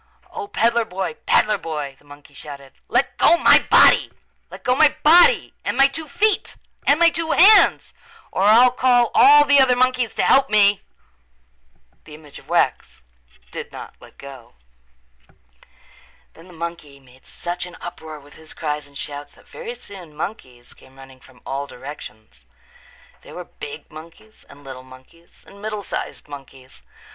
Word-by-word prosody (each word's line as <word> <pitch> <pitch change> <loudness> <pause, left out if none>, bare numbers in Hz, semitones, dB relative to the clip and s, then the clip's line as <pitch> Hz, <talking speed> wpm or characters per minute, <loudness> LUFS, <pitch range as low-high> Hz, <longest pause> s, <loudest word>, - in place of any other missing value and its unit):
"O, 430 -3 -7
peddler 235 - 0
boy, 190 -1 -5
peddler 210 -1 +2
boy," 150 -4 -6
the - - -27
monkey 145 0 -17
shouted, 140 -1 -12
"let - - -1
go 340 - +4
my - - +5
body! - - +5 0.4
Let - - -13
go 250 - +1
my 305 +1 +3
body 350 +11 +4
and - - -4
my 275 0 +5
two 310 +3 -8
feet 410 +9 -1 0.3
and 285 +3 +3
my 340 -1 +4
two 325 0 -3
hands 410 +5 +5 0.4
or - - -3
I'll 235 +4 +5
call 245 -2 +1
all 290 +2 +6
the 285 -1 +4
other 255 -1 +3
monkeys 255 -1 0
to - - -1
help 270 - +3
me!" 205 -1 +3 1.2
The 150 - -13
image 150 -2 -15
of - - -22
wax 65 - -2 0.5
did - - -8
not - - -11
let - - -18
go. 135 - -14 1.8
Then 165 +2 -18
the - - -16
monkey 165 -4 -8
made 130 -1 -22
such 175 +1 -6
an 175 - -14
uproar 160 -3 -10
with 145 0 -19
his 160 0 -15
cries 150 -2 -5
and 140 0 -14
shouts 145 0 -9
that - - -23
very 480 0 -9
soon 180 - -14
monkeys 130 - -9
came 130 0 -22
running 135 -1 -16
from 125 -1 -22
all 140 +1 -5
directions. 125 -6 -13 0.7
There - - -15
were - - -7
big 450 - -11
monkeys 165 +8 -16
and 145 0 -17
little 130 -2 -10
monkeys 130 +6 -20
and 200 0 -17
middle 210 -1 -6
sized - - -7
monkeys. 135 - -14
170 Hz, 165 wpm, -20 LUFS, -, 1.8 s, all